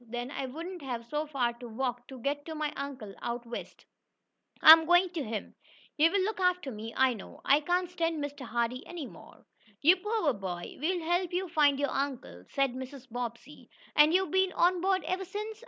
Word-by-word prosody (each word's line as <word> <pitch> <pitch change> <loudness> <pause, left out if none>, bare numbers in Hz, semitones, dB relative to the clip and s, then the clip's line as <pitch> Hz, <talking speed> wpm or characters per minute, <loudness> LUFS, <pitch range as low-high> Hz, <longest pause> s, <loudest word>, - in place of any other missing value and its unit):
Then 240 +2 -4
I 270 -2 -3
wouldn't 335 +6 -7
have 245 -4 -5
so 300 +5 -3
far 255 -5 0
to 245 - -8
walk 245 +1 -3
to 265 - -9
get 285 +4 -2
to 320 - -5
my 305 -1 -2
uncle 260 -8 -6
out 240 0 -4
west. 235 0 -8 0.7
I'm 320 0 +10
going 350 +1 +5
to 330 -5 -3
him. 215 -3 -5 0.4
He'll 330 +6 +4
look 430 +1 -2
after 360 -6 +1
me, 220 0 -7
I 260 -1 +4
know. 210 - -11
I 280 - +5
can't 355 +4 0
stand 335 -2 -1
Mr. 290 -1 -5
Hardee 235 +2 -1
any 340 -5 -6
more." - - -14 0.3
"You 340 +6 +6
poor 420 - 0
boy. 180 -4 -6
We'll 345 +3 -1
help 350 +1 +1
you 365 +1 -1
find 295 -4 +3
your 285 - 0
uncle," 255 - -4
said 275 -2 +1
Mrs. 260 0 -9
Bobbsey. 245 +4 -6 0.3
"And 300 +1 +7
you've 370 -2 +2
been 380 0 +2
on 355 0 +3
board 380 0 +1
ever 370 +1 -2
since?" 425 +3 -6
290 Hz, 195 wpm, -30 LUFS, 245-350 Hz, 0.7 s, I'm